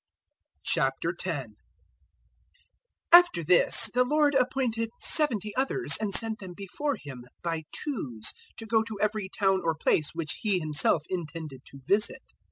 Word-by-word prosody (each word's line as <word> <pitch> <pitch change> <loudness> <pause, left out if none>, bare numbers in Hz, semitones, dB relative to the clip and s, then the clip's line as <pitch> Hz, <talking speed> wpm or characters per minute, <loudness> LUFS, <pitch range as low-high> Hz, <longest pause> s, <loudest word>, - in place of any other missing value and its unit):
010:001 140 - -2 1.6
After 345 - +7
this 180 +7 +4
the 250 +1 +3
Lord 295 +2 +1
appointed 250 -4 -1
seventy 225 - +1
others, 270 +8 +3
and 210 -2 -2
sent 220 +1 +4
them 185 -3 -10
before 275 +9 -4
Him, 130 -4 -11 0.2
by 165 -2 -4
twos, 125 - -3 0.2
to 225 - -8
go 225 0 +1
to 220 -2 -7
every 210 -2 -2
town 195 -1 0
or 165 -1 -1
place 155 0 0
which 165 -3 -4
He 205 -4 +1
Himself 155 -1 +1
intended 160 -6 -7
to 140 - -14
visit. 205 - 0
195 Hz, 135 wpm, -27 LUFS, 160-230 Hz, 1.6 s, After